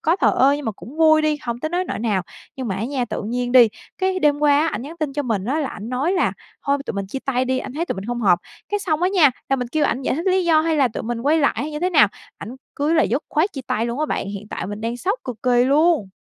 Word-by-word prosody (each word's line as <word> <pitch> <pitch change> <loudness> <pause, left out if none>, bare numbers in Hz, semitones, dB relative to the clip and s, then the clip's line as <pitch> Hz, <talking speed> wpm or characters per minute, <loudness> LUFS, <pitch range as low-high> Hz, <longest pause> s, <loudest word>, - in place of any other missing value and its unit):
có 330 +3 +2
thờ - - +3
ơ 270 +2 +5
nhưng 290 -1 -5
mà 220 - -1
cũng 205 - -12
vui 315 -1 +5
đi, 305 -1 +1
hông 235 -1 -3
tới 310 - -2
nối 355 +3 -1
nỗi - - -4
nào. 210 -5 0 0.3
Nhưng 260 -3 -4
mà 190 - -2
á 215 - -2
nha, 260 -1 -1
tự 220 - -5
nhiên 245 +3 -2
đi, 245 -3 +8 0.3
cái 375 0 0
đêm 295 -4 +2
qua 290 -1 +4
á, 315 - +2
ảnh 320 - -3
nhắn 305 +5 -9
tin 300 -3 -2
cho 290 - -2
mình 220 -7 -1
á 270 +8 0
là 280 - -2
ảnh 210 - -8
nói 265 +9 0
là 375 - +1 0.3
"Thôi 280 0 +2
tụi - - -3
mình 195 -1 -3
chia 270 - -5
tay 255 -2 0
đi, 260 0 0
anh 260 - -6
thấy 325 +5 -2
tụi - - -2
mình 190 - -6
hông 240 +2 -3
hợp." 180 -5 +4 0.3
Cái 415 0 -1
xong 325 -4 -1
á 360 - +4
nha, 355 -7 +5 0.2
là 270 - +2
mình 250 -1 -3
kêu 300 +3 0
ảnh 260 0 0
giải 255 - 0
thích 330 +7 -4
lý 375 0 +2
do 325 -2 +4
hay 320 0 0
là 270 -3 +3
tụi 225 - -6
mình 235 0 -3
quay 295 +5 +2
lại 285 - +2
hay 300 +2 -3
như 300 - -4
thế 365 +1 +1
nào, 220 - +6 0.3
ảnh 240 +5 -8 0.2
cứ 295 +3 +1
là 325 - +4
dứt 260 +7 0
khoát 345 +7 +1
chia 270 - -5
tay 225 +2 0
luôn 240 +3 -3
á 305 - +1
bạn. 195 - -2
Hiện 205 +1 -7
tại - - -4
mình 205 +2 -6
đang 230 +2 -3
sốc 390 - -1
cực 250 -3 -5
kỳ 245 -1 +3
luôn! 295 - +3
275 Hz, 320 wpm, -21 LUFS, 235-315 Hz, 0.3 s, đi